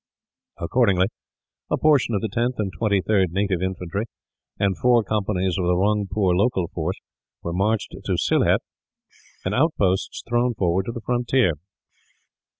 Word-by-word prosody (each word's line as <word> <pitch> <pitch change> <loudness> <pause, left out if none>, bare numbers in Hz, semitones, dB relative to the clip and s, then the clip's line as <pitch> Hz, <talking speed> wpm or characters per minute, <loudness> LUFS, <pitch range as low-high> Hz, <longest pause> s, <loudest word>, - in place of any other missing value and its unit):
Accordingly, 95 -1 +2 0.6
a - - +1
portion 145 -7 +3
of 100 - 0
the 110 - -1
10th 120 +4 -1
and 100 -3 -2
23rd 100 -3 +2
Native 95 -2 0
Infantry, 95 +2 -3 0.5
and 100 -2 +1
four 120 +1 +3
companies 95 -3 -1
of 90 - 0
the 90 - +3
Rungpoor 100 -1 +1
local 95 -4 +1
force, 85 +3 -3 0.4
were 85 - -3
marched 105 +4 0
to - - 0
Sylhet; - - +2 0.8
and 95 - -1
outposts 105 - +1
thrown 120 +1 +1
forward 95 0 0
to - - -1
the 115 - -7
frontier. 125 -3 +2
100 Hz, 140 wpm, -23 LUFS, 95-115 Hz, 0.8 s, portion